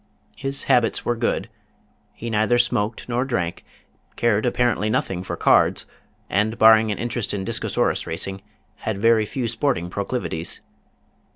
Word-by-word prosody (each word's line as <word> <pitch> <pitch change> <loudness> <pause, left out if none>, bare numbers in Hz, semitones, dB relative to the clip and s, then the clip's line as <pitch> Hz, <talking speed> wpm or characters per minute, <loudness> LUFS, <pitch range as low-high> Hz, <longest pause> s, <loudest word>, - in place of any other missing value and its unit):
His 135 +1 -2
habits 120 -2 +2
were 120 - +1
good. 115 -3 -1 0.7
He 115 0 -6
neither 110 +3 +2
smoked 115 -2 0
nor 125 +1 0
drank, 90 -11 -2 0.5
cared 115 0 +1
apparently 120 -4 +1
nothing 95 -4 -1
for 95 - -5
cards, - - +3 0.4
and 110 +3 0
barring 110 -1 +6
an 105 - -3
interest 120 -3 -2
in 95 -1 -4
Discosaurus - - 0
Racing, 95 +4 -4 0.4
had 110 -2 -3
very 110 0 +3
few 125 0 -3
sporting 115 -7 -1
proclivities. 100 -5 -3
110 Hz, 135 wpm, -22 LUFS, 100-120 Hz, 0.7 s, barring